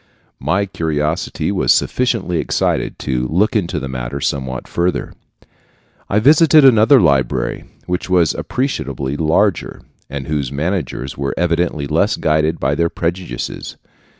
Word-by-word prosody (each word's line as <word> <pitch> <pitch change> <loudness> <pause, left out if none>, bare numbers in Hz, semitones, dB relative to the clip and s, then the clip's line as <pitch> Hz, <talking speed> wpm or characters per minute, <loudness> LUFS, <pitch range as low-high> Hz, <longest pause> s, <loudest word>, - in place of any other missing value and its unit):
My 100 +4 0
curiosity 80 -3 -2
was - - +2
sufficiently 115 -9 +1
excited - - -1
to 65 -1 -1
look 100 - +1
into 90 -5 0
the 65 - -5
matter 65 +1 -5
somewhat 65 -3 -3
further. 90 +1 -1 1.0
I 100 - +1
visited 155 +5 +6
another 125 +2 +6
library, 65 - +1 0.2
which 90 +1 -3
was 90 -4 +3
appreciably 70 - -3
larger, 85 +6 0 0.3
and 70 -1 -5
whose 70 -4 -2
managers 75 -3 -3
were 70 -1 -2
evidently 85 -3 0
less - - +1
guided 80 +1 0
by - - 0
their 85 0 +1
prejudices. 85 -7 -4
80 Hz, 125 wpm, -18 LUFS, 70-95 Hz, 1.0 s, visited